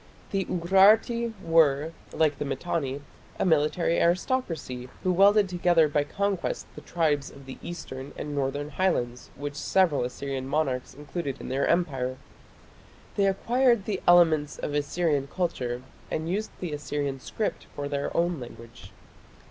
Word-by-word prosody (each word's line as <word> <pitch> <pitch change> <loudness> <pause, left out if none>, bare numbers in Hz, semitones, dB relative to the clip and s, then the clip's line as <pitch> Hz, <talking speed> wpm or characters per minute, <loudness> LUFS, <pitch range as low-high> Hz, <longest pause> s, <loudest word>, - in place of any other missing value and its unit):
The 195 -2 0
Urarti 210 +7 +4
were, 160 -2 +3 0.2
like 150 -3 +1
the - - -1
Mitanni, 140 0 -2 0.4
a - - 0
military 165 +1 +2
aristocracy 170 - -1
who 185 - +2
welded 200 +2 +5
together 175 -3 +3
by 145 0 +1
conquest 200 +3 -2
the - - -10
tribes 150 -4 0
of 140 -1 -14
the 135 - -9
eastern 145 -5 -7
and 150 - -5
northern 145 +1 -2
Highlands 125 -10 -1
which 145 +1 -5
several 150 -1 +2
Assyrian 130 +1 -4
monarchs 135 -4 -1
included 145 -1 -5
in - - -7
their 135 +2 0
Empire. 135 -7 0 1.0
They 200 -1 +3
acquired 235 +2 +2
the 200 -3 -2
elements 160 -4 +5
of 145 - -4
Assyrian 145 -1 0
culture, 130 -8 -2 0.3
and 160 +1 -2
used 205 +5 -1
the 175 -4 -4
Assyrian 145 -2 -3
script 215 +10 -3
for 145 0 -3
their 140 0 -2
own 170 -2 +1
language. 115 -4 -11
155 Hz, 140 wpm, -27 LUFS, 140-180 Hz, 1.0 s, welded